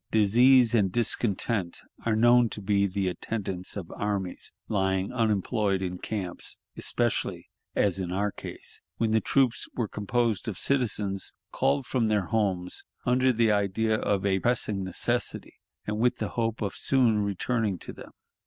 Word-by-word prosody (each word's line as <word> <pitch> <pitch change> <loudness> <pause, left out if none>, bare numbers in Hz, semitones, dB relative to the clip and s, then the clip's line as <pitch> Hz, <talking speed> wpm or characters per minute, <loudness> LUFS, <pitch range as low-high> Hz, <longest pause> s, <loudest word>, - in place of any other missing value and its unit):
Disease 120 +3 +5
and 100 -5 +3
discontent 105 -4 -1 0.3
are 110 - +3
known 120 +1 +5
to - - -6
be 100 0 +2
the 95 0 -1
attendants 95 +1 -3
of 90 -4 -6
armies 100 -3 -3 0.2
lying 95 0 0
unemployed 105 -3 +1
in 90 -1 -4
camps, 95 -5 -5 0.2
especially, - - -1 0.2
as 95 -2 +2
in 90 -2 -3
our 100 +2 0
case, - - -9 0.2
when 115 -1 +1
the 110 0 +3
troops 130 -3 +1
were 115 -3 -1
composed 115 +2 -1
of 105 -5 -3
citizens 105 -7 0 0.2
called 140 -2 +1
from 120 -3 0
their 105 -3 +1
homes 95 -4 -1 0.2
under 130 +1 +3
the 115 -2 +3
idea 105 +2 +1
of 100 -2 0
a 95 -1 +2
pressing 105 -3 0
necessity, 95 -1 -2 0.3
and 105 0 -2
with 125 +2 +2
the - - -3
hope 115 -1 -1
of 100 - -2
soon 120 -5 +3
returning 105 +1 0
to - - -7
them. - - -11
105 Hz, 155 wpm, -27 LUFS, 95-115 Hz, 0.3 s, Disease